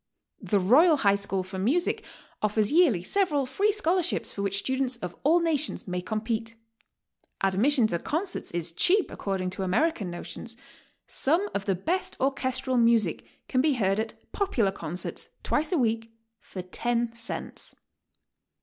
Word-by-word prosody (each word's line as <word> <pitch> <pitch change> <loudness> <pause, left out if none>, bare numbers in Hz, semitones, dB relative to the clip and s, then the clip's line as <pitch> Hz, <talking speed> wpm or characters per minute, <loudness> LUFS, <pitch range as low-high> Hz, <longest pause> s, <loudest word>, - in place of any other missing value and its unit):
The 205 - +1
Royal 295 - +5
High 200 -7 +4
School 200 -1 -1
for 190 +1 -6
Music 280 - +1 0.4
offers 210 0 +1
yearly 295 - +4
several 300 - +1
free 405 +11 +1
scholarships 365 -4 0
for 200 - -4
which 200 0 0
students 260 +4 -1
of 180 -7 -7
all 320 +5 +4
nations 315 -8 0
may 180 0 -2
compete. 220 +3 -3 0.9
Adm'ission 220 +6 +3
to 170 - 0
concerts 355 - -2
is 170 -1 -2
cheap 375 - +3
according 190 -2 -2
to 190 - -5
American 200 - +1
notions; 225 +6 -7 0.5
some 335 +9 +2
of 200 - -2
the 195 - +1
best 340 - -2
orchestral 260 -1 0
music 230 -7 +2 0.2
can 255 - +2
be 300 +1 +3
heard 195 -4 +1
at 220 0 -3 0.2
"popular 255 - +1
con 170 -4 -6
certs" 180 - -5 0.2
twice 300 +3 0
a 355 - +2
week 225 -3 0 0.3
for 185 -5 -8
10 235 +5 -1
cents. 235 0 -5
235 Hz, 150 wpm, -27 LUFS, 195-300 Hz, 0.9 s, Royal